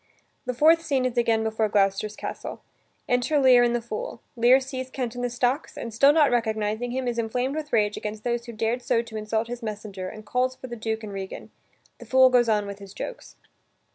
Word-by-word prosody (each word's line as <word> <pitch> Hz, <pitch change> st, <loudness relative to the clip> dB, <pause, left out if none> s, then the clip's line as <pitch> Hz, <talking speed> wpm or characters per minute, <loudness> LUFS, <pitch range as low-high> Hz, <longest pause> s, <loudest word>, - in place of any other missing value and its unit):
The 250 Hz, -, -2 dB
fourth 320 Hz, +5 st, +5 dB
scene 275 Hz, -5 st, 0 dB
is 255 Hz, -1 st, -1 dB
again 230 Hz, -2 st, +2 dB
before 220 Hz, -1 st, 0 dB
Gloucester's 200 Hz, +1 st, +1 dB
castle. -, -, -6 dB, 0.4 s
Enter 250 Hz, +5 st, +1 dB
Lear 260 Hz, -3 st, +6 dB
and 240 Hz, 0 st, +3 dB
the 235 Hz, -, -2 dB
fool. 230 Hz, 0 st, -5 dB, 0.2 s
Lear 245 Hz, +3 st, +6 dB
sees 260 Hz, -1 st, -6 dB
Kent 250 Hz, -3 st, -3 dB
in 245 Hz, -, -5 dB
the 245 Hz, -, 0 dB
stocks, 245 Hz, +4 st, -1 dB
and, 230 Hz, -, -6 dB
still 275 Hz, +6 st, +6 dB
not 295 Hz, -2 st, +4 dB
recognizing 220 Hz, 0 st, 0 dB
him, 255 Hz, +1 st, -2 dB
is 235 Hz, -1 st, -1 dB
inflamed 250 Hz, +4 st, -1 dB
with 310 Hz, -1 st, -5 dB
rage 210 Hz, -2 st, +2 dB
against 210 Hz, 0 st, -5 dB
those 240 Hz, -1 st, -1 dB
who -, -, -5 dB
dared 225 Hz, +2 st, -1 dB
so 235 Hz, -1 st, +1 dB
to 230 Hz, -1 st, -11 dB
insult 220 Hz, +1 st, -1 dB
his 245 Hz, +1 st, -6 dB
messenger, 205 Hz, -4 st, -5 dB
and 215 Hz, 0 st, -11 dB
calls 255 Hz, +4 st, 0 dB
for 255 Hz, -, -10 dB
the 240 Hz, -2 st, -6 dB
Duke 220 Hz, 0 st, -3 dB
and 205 Hz, -2 st, -7 dB
Regan. 195 Hz, -1 st, -7 dB, 0.5 s
The -, -, -12 dB
fool 260 Hz, 0 st, +6 dB
goes 240 Hz, -2 st, +4 dB
on 210 Hz, -2 st, +2 dB
with 200 Hz, 0 st, -7 dB
his 200 Hz, -1 st, -12 dB
jokes. -, -, -7 dB
235 Hz, 220 wpm, -25 LUFS, 215-255 Hz, 0.5 s, Lear